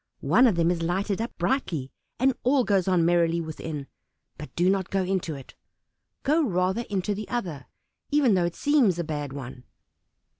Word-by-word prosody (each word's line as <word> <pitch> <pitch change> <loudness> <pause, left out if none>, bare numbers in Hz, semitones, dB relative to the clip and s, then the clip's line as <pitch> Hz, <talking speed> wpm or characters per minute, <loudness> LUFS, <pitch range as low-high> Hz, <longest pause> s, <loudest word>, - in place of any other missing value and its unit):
One 255 - +5
of 215 - +2
them 170 0 +2
is 170 -2 -2
lighted 190 +5 -1
up 230 - -3
brightly, 175 - -1 0.3
and 265 +2 +3
all 260 +1 +3
goes 195 -5 +1
on 180 -3 +3
merrily 170 -1 +3
within, 160 -2 -5 0.5
but 150 - -9
do 175 +1 +2
not 190 -1 +1
go 195 -1 0
into 185 -4 -2
it; 135 -2 -11 0.7
go 305 +4 +3
rather 190 0 0
into 200 0 -1
the 210 +1 -6
other, 170 - -4 0.4
even 285 -6 +3
though 180 -2 +2
it 170 - -3
seems 275 - +3
a 170 - -1
bad 145 -3 -4
one." 130 -2 -8
180 Hz, 180 wpm, -26 LUFS, 165-220 Hz, 0.7 s, One